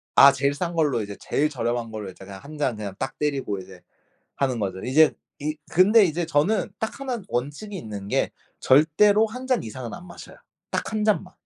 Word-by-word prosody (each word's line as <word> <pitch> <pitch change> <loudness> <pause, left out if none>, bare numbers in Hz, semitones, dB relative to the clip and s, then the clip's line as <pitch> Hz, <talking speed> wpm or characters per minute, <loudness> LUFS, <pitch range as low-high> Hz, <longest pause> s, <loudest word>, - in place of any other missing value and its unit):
아 140 0 +9
제일 140 +1 0
싼 170 +4 -3
걸로 150 -8 +1
이제 100 -1 -6
제일 150 +2 0
저렴한 120 -4 -2
걸로 105 -3 -6
이제 95 +1 -12
그냥 95 -1 -9
1 150 +1 -10
잔 130 -6 0
그냥 100 -2 -6
딱 135 0 -4
때리고 135 -9 -1
이제 95 -1 -12 0.6
하는 130 -4 0
거죠. 95 -2 -3
이제 150 +5 +5 0.3
이 155 +2 -2 0.2
근데 205 +5 +6
이제 170 0 0
저는 165 +8 +1
딱 220 +4 -4
1 255 -4 -3
원칙이 145 - -3
있는 105 - -7
게 - - +1 0.3
절대로 200 +10 +5
1 250 +4 -8
잔 255 -3 +1
이상은 115 +1 -7
안 180 +1 -10
마셔요. 175 - -12 0.3
딱 - - -2
1 215 -1 0
잔만. 200 -3 +1
145 Hz, 325 characters per minute, -24 LUFS, 115-180 Hz, 0.6 s, 아